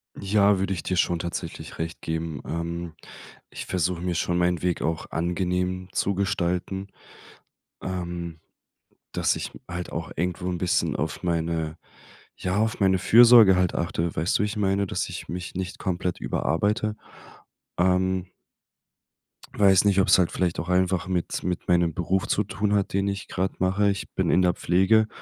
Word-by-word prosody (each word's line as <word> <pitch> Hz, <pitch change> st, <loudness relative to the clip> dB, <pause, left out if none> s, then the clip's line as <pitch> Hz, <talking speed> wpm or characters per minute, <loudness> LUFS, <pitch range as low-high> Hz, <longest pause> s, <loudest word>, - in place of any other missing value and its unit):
Ja, 100 Hz, 0 st, +3 dB
würde 95 Hz, 0 st, 0 dB
ich 85 Hz, -, -5 dB
dir 90 Hz, -, -1 dB
schon 85 Hz, -1 st, +2 dB
tatsächlich 85 Hz, +1 st, -6 dB
recht 80 Hz, 0 st, -5 dB
geben. 80 Hz, -3 st, -3 dB
Ähm, 85 Hz, 0 st, -4 dB, 0.6 s
ich -, -, -7 dB
versuche 90 Hz, -1 st, -1 dB
mir 90 Hz, -1 st, -2 dB
schon 85 Hz, +1 st, 0 dB
meinen 90 Hz, -1 st, +1 dB
Weg 90 Hz, -1 st, -1 dB
auch 80 Hz, +2 st, -2 dB
angenehm 90 Hz, +2 st, -1 dB
zu 100 Hz, 0 st, 0 dB
gestalten. 95 Hz, 0 st, -1 dB, 1.0 s
Ähm, 85 Hz, -3 st, -5 dB, 0.7 s
dass -, -, +1 dB
ich -, -, -5 dB, 0.2 s
halt 90 Hz, 0 st, -5 dB
auch 80 Hz, -1 st, -4 dB
irgendwo 90 Hz, +2 st, -2 dB
'n 90 Hz, -, -3 dB
bisschen 90 Hz, 0 st, +1 dB
auf 75 Hz, -1 st, -3 dB
meine 85 Hz, -2 st, -1 dB, 0.6 s
ja, 90 Hz, 0 st, -1 dB
auf 110 Hz, +1 st, 0 dB
meine 95 Hz, -1 st, +3 dB
Fürsorge 115 Hz, -2 st, +7 dB
halt 90 Hz, -1 st, +1 dB
achte. 85 Hz, -1 st, -2 dB
Weißt 85 Hz, -, +1 dB
du, -, -, +1 dB
wie -, -, +1 dB
ich 105 Hz, +1 st, -5 dB
meine, 100 Hz, -1 st, +1 dB
dass -, -, -2 dB
ich -, -, -7 dB
mich 90 Hz, +1 st, -6 dB
nicht 95 Hz, -1 st, -4 dB
komplett 90 Hz, -2 st, -2 dB
überarbeite? 105 Hz, +5 st, 0 dB, 0.8 s
Ähm 95 Hz, 0 st, +1 dB, 1.3 s
weiß 95 Hz, -1 st, +5 dB
nicht, 100 Hz, -1 st, +4 dB
ob 95 Hz, -, +1 dB
es 95 Hz, -, +6 dB
halt 90 Hz, -, +2 dB
vielleicht 90 Hz, -2 st, -1 dB
auch 85 Hz, -, -4 dB
einfach 90 Hz, -1 st, +1 dB
mit 90 Hz, -2 st, -2 dB
mit 90 Hz, -1 st, -3 dB
meinem 85 Hz, -2 st, +3 dB
Beruf 90 Hz, +3 st, -1 dB
zu 105 Hz, -, +1 dB
tun 105 Hz, 0 st, -1 dB
hat, 100 Hz, -1 st, 0 dB
den 100 Hz, 0 st, +1 dB
ich 100 Hz, -1 st, -3 dB
gerade 95 Hz, +1 st, -2 dB
mache. 95 Hz, +2 st, +2 dB
Ich 100 Hz, -, -3 dB
bin -, -, 0 dB
in 90 Hz, -, +4 dB
der 90 Hz, -1 st, +3 dB
Pflege, 95 Hz, +7 st, +3 dB
90 Hz, 170 wpm, -25 LUFS, 85-95 Hz, 1.3 s, Fürsorge